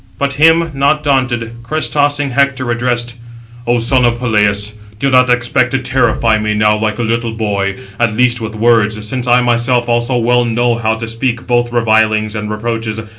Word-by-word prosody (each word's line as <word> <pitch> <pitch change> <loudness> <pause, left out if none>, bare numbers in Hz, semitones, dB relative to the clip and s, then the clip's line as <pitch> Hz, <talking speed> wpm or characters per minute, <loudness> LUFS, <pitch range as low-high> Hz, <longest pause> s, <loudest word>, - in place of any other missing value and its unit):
But 140 0 -1
him, 165 +3 +3
not 140 +2 +1
daunted, 125 -5 -1
crest 155 +7 -2
tossing 145 -1 0
Hector 130 -1 0
addressed: 120 0 -2 0.5
"O 120 0 +2
son 125 +2 +2
of 120 -1 +1
Peleus, 105 -3 +1 0.2
do 135 +4 -1
not 125 0 +4
expect 125 0 +1
to - - +2
terrify 120 -4 +1
me 105 0 -1
now 105 0 +2
like 110 0 -2
a 120 - -2
little 115 0 -2
boy, 100 -3 -2 0.2
at 115 -2 0
least 120 0 +2
with 110 0 -6
words; 110 -2 +1
since 125 +2 -3
I 125 +1 +4
myself 120 0 +1
also 120 +1 0
well 120 +1 +2
know 120 +1 0
how 110 -1 -1
to 115 0 -6
speak 120 +1 -3
both 120 -1 0
revilings 110 -2 +1
and 105 -1 -5
reproaches. 110 0 -3
120 Hz, 180 wpm, -14 LUFS, 110-125 Hz, 0.5 s, not